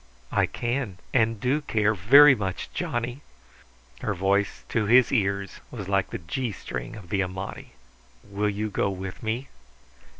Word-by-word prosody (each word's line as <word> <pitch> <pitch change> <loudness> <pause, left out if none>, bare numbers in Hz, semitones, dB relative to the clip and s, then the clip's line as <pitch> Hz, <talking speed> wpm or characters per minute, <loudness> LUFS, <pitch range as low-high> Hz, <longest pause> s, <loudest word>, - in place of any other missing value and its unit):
"I - - +2
can 120 -5 -3 0.2
and 115 -3 +2
do 130 +7 +1
care 105 -6 +1
very 135 +10 +8
much, 95 -6 -4
Johnny." 120 +3 -3 0.8
Her 105 - -2
voice 100 +2 0
to 110 -2 0
his 125 +2 +6
ears 100 -4 0
was 105 -6 -7
like 100 -1 +1
the - - -4
G 110 +8 -3
string 60 -10 -6
of 95 -5 -11
the 100 0 +1
Amati. 95 +1 -5 0.5
"Will 100 +1 -1
you 105 +1 -3
go 100 - 0
with 95 -1 -6
me?" 115 +5 -2
105 Hz, 155 wpm, -26 LUFS, 95-120 Hz, 0.8 s, very